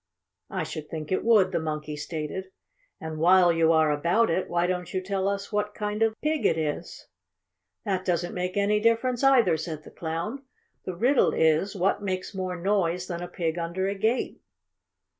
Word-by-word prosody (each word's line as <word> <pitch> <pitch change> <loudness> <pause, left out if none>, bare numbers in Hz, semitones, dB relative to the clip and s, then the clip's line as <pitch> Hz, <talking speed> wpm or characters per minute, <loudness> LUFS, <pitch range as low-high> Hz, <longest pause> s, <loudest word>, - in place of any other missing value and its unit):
"I - - -2
should 150 -1 -7
think 155 0 -6
it 185 - +1
would," 210 -5 +4
the 170 - 0
Monkey 150 -1 -4
stated. 155 +5 -5 0.5
"And 160 -1 -6
while 175 +1 +5
you 165 0 +3
are 160 -1 +4
about 170 +9 +2
it, 185 +3 -1
why 175 0 +1
don't 180 -1 -2
you 185 - -1
tell 190 +1 -2
us 200 +1 -2
what 210 0 -1
kind 210 +1 -3
of 225 0 +1
pig 305 0 0
it - - +3
is?" 150 -2 -4 0.8
"That 185 -1 -1
doesn't 175 -1 -1
make 180 +1 -3
any 205 +1 +2
difference 230 +3 +1
either," 240 -11 +5
said 160 -1 -5
the - - -13
Clown. 170 +11 -4 0.4
"The 185 - -4
riddle 245 +9 +3
is 160 +5 +2
what 195 +2 +1
makes 185 -1 -3
more 185 -1 -3
noise 180 -2 0
than 175 -2 -5
a 175 - -4
pig 170 -1 -2
under 170 +3 -2
a 200 - 0
gate." 220 +5 -1
185 Hz, 185 wpm, -26 LUFS, 165-205 Hz, 0.8 s, while